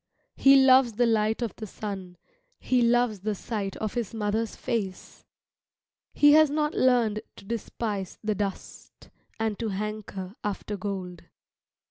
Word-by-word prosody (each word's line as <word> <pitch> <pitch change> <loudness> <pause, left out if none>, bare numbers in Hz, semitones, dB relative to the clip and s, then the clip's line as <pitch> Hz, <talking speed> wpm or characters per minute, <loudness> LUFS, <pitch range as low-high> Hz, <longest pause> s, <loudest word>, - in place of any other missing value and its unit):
He 275 0 +6
loves 260 -3 +6
the 240 +3 +2
light 220 0 +1
of 230 - -4
the 215 - -6
sun, 190 -3 -7 0.4
he 255 -1 +1
loves 235 -3 +2
the 210 +2 -2
sight 200 -2 -4
of 215 -2 -3
his 235 -2 -3
mother's 215 +1 -1
face. 200 -5 -4 0.8
He 290 0 +5
has 310 0 +6
not 300 +1 0
learned 235 -5 +2
to - - -14
despise 210 -3 -4
the 215 0 0
dust, 200 -1 -6 0.3
and 220 -2 -1
to 225 - -2
hanker 200 -2 -5
after 210 0 -3
gold. 185 -3 -5
215 Hz, 140 wpm, -27 LUFS, 200-240 Hz, 0.8 s, He